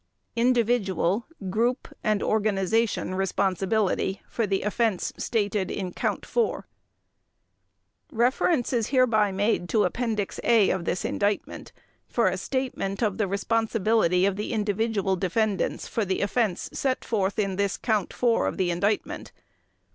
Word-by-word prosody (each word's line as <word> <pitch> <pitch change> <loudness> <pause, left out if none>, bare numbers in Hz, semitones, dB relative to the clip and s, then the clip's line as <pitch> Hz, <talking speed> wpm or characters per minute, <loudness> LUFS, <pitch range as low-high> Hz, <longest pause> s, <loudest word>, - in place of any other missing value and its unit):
Individual, 230 -5 +1 0.2
Group 240 +5 0 0.2
and 215 -2 +1
Organization 215 -1 +1
Responsibility 195 +1 0
for 230 -3 -1
the 195 0 0
Offense 210 -1 0
Stated 205 -4 -1
in 185 -3 -4
Count - - -2
Four 470 -2 0 1.5
Reference 250 +3 +1
is 230 -3 +1
hereby 230 -6 +3
made 195 -2 0
to 215 -2 +3
Appendix 215 0 -2
A 225 -4 +4
of 180 -2 -2
this 180 - -1
Indictment 205 0 -2 0.4
for - - +2
a - - -2
statement 250 -6 -2
of 205 -2 0
the 210 - +2
responsibility 215 -2 +1
of 195 -1 0
the 210 +3 -3
individual 210 -2 0
defendants 195 +2 -1
for 225 - -1
the 190 -1 -1
offense 205 -2 0
set 260 -2 -1
forth 200 -3 0
in 195 -3 0
this 200 -1 0
Count 215 -5 0
Four 240 -2 +1
of - - -3
the 185 -3 +1
Indictment. 200 +5 -1
210 Hz, 130 wpm, -26 LUFS, 195-230 Hz, 1.5 s, A